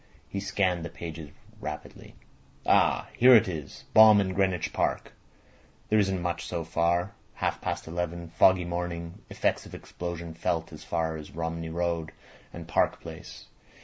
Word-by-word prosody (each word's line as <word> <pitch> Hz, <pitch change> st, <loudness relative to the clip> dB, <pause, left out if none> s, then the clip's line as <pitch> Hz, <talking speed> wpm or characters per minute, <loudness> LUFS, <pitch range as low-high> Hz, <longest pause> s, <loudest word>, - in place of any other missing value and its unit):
He 100 Hz, -, -4 dB
scanned 95 Hz, -3 st, 0 dB
the 85 Hz, -, -5 dB
pages 80 Hz, -2 st, -7 dB, 0.3 s
rapidly. -, -, -8 dB, 0.5 s
"Ah! -, -, +3 dB
Here 125 Hz, +1 st, +8 dB
it 110 Hz, -, +6 dB
is. 80 Hz, -6 st, -6 dB
Bomb 110 Hz, -1 st, +9 dB
in 95 Hz, -2 st, 0 dB
Greenwich 95 Hz, -3 st, 0 dB
Park. -, -, -1 dB, 0.8 s
There 110 Hz, -, +4 dB
isn't 95 Hz, -3 st, +1 dB
much 85 Hz, 0 st, -2 dB
so 85 Hz, -2 st, -3 dB
far. 85 Hz, +3 st, 0 dB, 0.2 s
Half -, -, -2 dB
past -, -, -3 dB
eleven. 85 Hz, 0 st, -4 dB
Foggy 95 Hz, 0 st, +5 dB
morning. 85 Hz, -1 st, -4 dB
Effects -, -, -1 dB
of -, -, -10 dB
explosion 85 Hz, -1 st, -6 dB
felt 80 Hz, 0 st, -2 dB
as 75 Hz, -, -10 dB
far 80 Hz, -1 st, -1 dB
as 75 Hz, -, -9 dB
Romney 80 Hz, 0 st, -3 dB
Road 85 Hz, -1 st, -2 dB, 0.4 s
and 85 Hz, -1 st, -9 dB
Park 75 Hz, -, +1 dB
Place. -, -, -10 dB
85 Hz, 150 wpm, -28 LUFS, 80-90 Hz, 0.8 s, Bomb